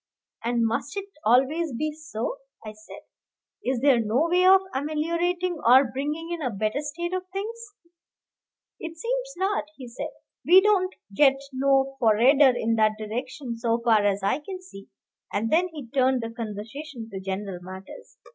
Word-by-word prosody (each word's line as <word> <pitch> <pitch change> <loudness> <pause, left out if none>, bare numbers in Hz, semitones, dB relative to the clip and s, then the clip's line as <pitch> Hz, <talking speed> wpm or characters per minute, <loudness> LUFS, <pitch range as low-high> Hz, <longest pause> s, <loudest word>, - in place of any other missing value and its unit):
"And 235 0 +1
must 245 - -2
it 395 - -3 0.2
always 270 +6 +2
be 310 +3 -1
so?" 300 - -5 0.3
I 215 - -5
said. 215 0 -13 0.6
"Is 255 -2 -1
there 275 -3 +5
no 230 +8 +1
way 360 +1 +4
of 380 0 +7
ameliorating 335 +5 -1
or 250 +1 +6
bringing 300 +5 -4
in 340 -1 -3
a 260 - -1
better 215 +4 -1
state 345 +4 -4
of 370 0 -3
things?" 425 +2 -6 1.0
"It 330 0 -7
seems - - -3
not," 385 -3 0
he 255 -3 -9
said; 235 - -6 0.3
"we 360 +3 +8
don't 380 -2 +2 0.2
get 270 +3 +4
'no 270 0 +2
forrarder' 250 +4 +5
in 225 0 0
that 215 -1 +4
direction 240 +3 -5
so 230 -1 +1
far 225 -3 +3
as 200 -1 +1
I 200 +8 +1
can 370 +5 -7
see." 200 - -13 0.4
And 220 +3 -1
then 350 +3 +4
he 300 -7 -9
turned 260 -1 +2
the 230 - -4
conversation 230 +4 -7
to 195 - -5
general 190 -1 -4
matters. 190 - -11
270 Hz, 165 wpm, -25 LUFS, 230-335 Hz, 1.0 s, we